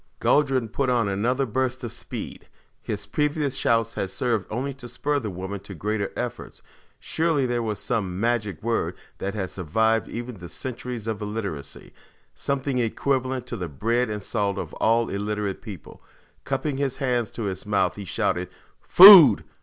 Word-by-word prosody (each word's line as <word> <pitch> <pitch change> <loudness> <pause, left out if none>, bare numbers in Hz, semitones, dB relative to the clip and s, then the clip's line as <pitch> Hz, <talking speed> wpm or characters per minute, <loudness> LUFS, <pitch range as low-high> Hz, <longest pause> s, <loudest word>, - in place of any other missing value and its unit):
Guldran 135 -5 +2
put 135 +4 -1
on 120 -4 +2
another 120 +8 0
burst 130 +2 -2
of 115 -2 -5
speed. 120 - -7 0.3
His - - -5
previous 150 -2 -1
shouts 115 -3 +1
had 95 - -3
served 115 -3 -1
only 130 +5 -3
to 125 -2 -11
spur 145 +4 -1
the 110 -5 -4
woman 95 +2 -5
to 100 - -10
greater 105 +3 -2
efforts. 125 -1 -6 0.4
Surely 160 -4 0
there 120 -1 -1
was 110 -2 -2
some 95 -2 -2
magic 105 -6 -1
word 115 0 -1 0.2
that 100 +2 -3
had 95 -3 -3
survived 110 +6 +1
even 120 -1 -6
the 85 -1 -10
centuries 125 -3 -6
of 110 -2 -3
illiteracy. 105 -9 -5 0.4
Something 140 -2 -1
equivalent 130 +2 -1
to - - -5
the 90 -2 -5
"bread 115 - 0
and 105 -2 -4
salt" 100 -3 -1
of - - -5
all 115 +1 +2
illiterate 105 0 -3
peoples. 100 -8 -10 0.5
Cupping 145 -3 -2
his 135 -2 -1
hands 125 -5 0
to 115 - -5
his 95 -1 -4
mouth, 95 -3 +1
he 105 - -7
shouted, 90 0 -1 0.3
"Food! 175 - +10
115 Hz, 165 wpm, -24 LUFS, 100-130 Hz, 0.5 s, Food